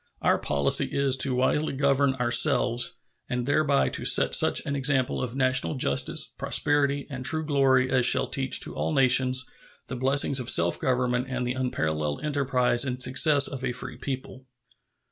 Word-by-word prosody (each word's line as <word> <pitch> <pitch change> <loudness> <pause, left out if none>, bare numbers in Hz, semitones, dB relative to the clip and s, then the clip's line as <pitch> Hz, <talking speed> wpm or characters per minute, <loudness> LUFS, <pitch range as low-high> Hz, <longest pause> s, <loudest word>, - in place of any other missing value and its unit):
Our - - +1
policy 70 -1 +1
is 135 -2 0
wisely 130 +4 -1
to - - -8
govern 140 -1 0
ourselves, 120 -1 +1 0.4
and 125 -1 -3
thereby 145 0 0
to - - -8
set - - +3
such - - +4
an 140 - -4
example 135 -2 0
of 125 -1 -6
national 130 +2 0
justice, 70 - -1
prosperity, 145 -1 0
and 130 -1 -7
true 155 +3 -1
glory 135 -3 +1
as 130 -2 +1
shall 120 - +4
teach 135 0 -1
to - - -4
all - - -4
nations 130 -1 +2 0.4
the 125 - -5
blessings 135 +1 +1
of 125 -1 -3
self 85 -4 +3
government 125 0 -2
and 130 -1 -4
the 125 - -3
unparalleled 80 - -4
enterprise 130 -4 +1
and 130 -2 -4
success 140 +3 +4
of 135 -2 -6
a 125 -1 -3
free 125 - -8
people. 130 -1 -8
130 Hz, 165 wpm, -25 LUFS, 125-140 Hz, 0.4 s, such